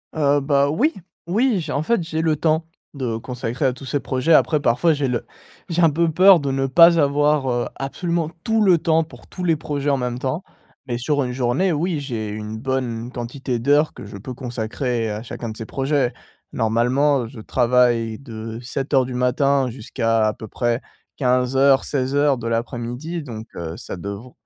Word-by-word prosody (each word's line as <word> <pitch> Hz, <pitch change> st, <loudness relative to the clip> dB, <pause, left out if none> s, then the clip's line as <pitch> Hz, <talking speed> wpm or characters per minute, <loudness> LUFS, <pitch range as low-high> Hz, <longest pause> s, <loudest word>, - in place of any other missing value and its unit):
Heu, 145 Hz, -1 st, +3 dB
bah, 140 Hz, 0 st, +2 dB
oui, 255 Hz, -, +2 dB, 0.3 s
oui 220 Hz, +2 st, +2 dB
j'ai 155 Hz, -2 st, -5 dB
en 145 Hz, -, 0 dB
fait, 230 Hz, +1 st, +1 dB
j'ai 160 Hz, 0 st, -2 dB
le 160 Hz, -1 st, +2 dB
temps 160 Hz, +1 st, +1 dB, 0.3 s
de 125 Hz, -5 st, -3 dB
consacrer 125 Hz, +2 st, -3 dB
à 130 Hz, -, +2 dB
tous 135 Hz, -, -10 dB
ces 140 Hz, +2 st, -1 dB
projets. 130 Hz, +6 st, +1 dB
Après, 155 Hz, -1 st, +4 dB
parfois, 160 Hz, +8 st, +3 dB
j'ai 145 Hz, -2 st, -1 dB
le 120 Hz, -, -2 dB, 0.4 s
j'ai 170 Hz, +1 st, +1 dB
un 165 Hz, -, +6 dB
peu 165 Hz, +2 st, +1 dB
peur 185 Hz, +1 st, +7 dB
de 140 Hz, -1 st, -2 dB
ne 135 Hz, 0 st, 0 dB
pas 170 Hz, +5 st, +6 dB
avoir, 145 Hz, -1 st, +2 dB
heu, 120 Hz, 0 st, 0 dB
absolument 165 Hz, +3 st, -2 dB
tout 225 Hz, -1 st, +2 dB
le 185 Hz, -4 st, +5 dB
temps 160 Hz, 0 st, +2 dB
pour 160 Hz, -, -15 dB
tous 180 Hz, -, -7 dB
les 165 Hz, -2 st, +3 dB
projets, 145 Hz, -1 st, -2 dB
en 140 Hz, -, +2 dB
même 125 Hz, -1 st, -2 dB
temps, 135 Hz, +8 st, -2 dB, 0.4 s
mais 120 Hz, -, -2 dB
sur 145 Hz, +4 st, 0 dB
une 125 Hz, 0 st, -3 dB
journée, 135 Hz, +9 st, +1 dB
oui, 165 Hz, +1 st, -1 dB
j'ai 115 Hz, -6 st, -4 dB
une 105 Hz, +1 st, -5 dB
bonne 125 Hz, -2 st, -3 dB
quantité 125 Hz, 0 st, -4 dB
d'heures 145 Hz, +5 st, +3 dB
que -, -, -10 dB
je 100 Hz, 0 st, -9 dB
peux 125 Hz, +6 st, -7 dB
consacrer 120 Hz, -1 st, -3 dB
à 105 Hz, +1 st, -4 dB
chacun 115 Hz, -1 st, -6 dB
de 110 Hz, -, -7 dB
ces 115 Hz, -, -6 dB
projets. 135 Hz, -1 st, 0 dB, 0.4 s
Normalement, 125 Hz, +4 st, +2 dB
je 115 Hz, -1 st, -10 dB
travaille 120 Hz, -2 st, +2 dB
de 115 Hz, -3 st, -7 dB
07:00 135 Hz, +1 st, 0 dB
du 130 Hz, -, -6 dB
matin 130 Hz, +2 st, +2 dB
jusqu'à 115 Hz, -1 st, 0 dB
à 105 Hz, -, 0 dB
peu 110 Hz, -, -9 dB
près 120 Hz, +3 st, -1 dB, 0.4 s
15:00-16:00 135 Hz, +2 st, +2 dB
de 115 Hz, -, -5 dB
l'après-midi, 120 Hz, +8 st, -3 dB
donc 110 Hz, -4 st, -8 dB
heu, 80 Hz, -1 st, -5 dB
ça 90 Hz, -, -7 dB
devr 100 Hz, +7 st, -7 dB
135 Hz, 190 wpm, -21 LUFS, 120-150 Hz, 0.4 s, peur